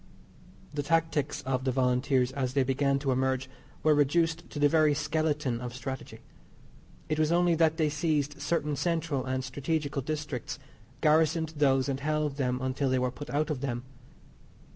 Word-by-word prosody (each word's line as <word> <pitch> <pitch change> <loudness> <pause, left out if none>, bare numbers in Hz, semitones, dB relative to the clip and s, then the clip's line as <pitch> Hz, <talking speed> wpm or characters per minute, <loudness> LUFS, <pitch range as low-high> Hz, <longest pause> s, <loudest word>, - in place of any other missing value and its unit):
The 145 - -1
tactics 155 -1 0
of 130 0 -1
the 130 - +1
Volunteers 125 0 +2
as 130 -2 -2
they 135 - +4
began 135 +1 +1
to 135 -1 -1
emerge 130 0 0 0.4
were 155 - +5
reduced 165 +3 +1
to - - -8
the 145 0 +5
very 155 -1 +4
skeleton 150 -4 -1
of 125 -1 -6
"strategy." 130 0 -6 0.9
It 155 0 -1
was 155 0 +2
only 175 0 +4
that 160 -1 +3
they 155 -2 +2
seized 150 -1 -1
certain 150 -3 0
central 160 -2 -1
and 130 0 -2
stragetical 140 +2 -2
districts, 150 -3 -4 0.4
garrisoned 160 +1 +3
those 135 -2 +3
and 135 -1 -1
held 150 -1 -1
them 125 -2 0
until 130 +1 0
they 130 - +2
were 125 0 0
put 130 +4 -9
out 150 +2 0
of 135 -4 -3
them. 120 -3 -3
145 Hz, 165 wpm, -29 LUFS, 130-155 Hz, 0.9 s, were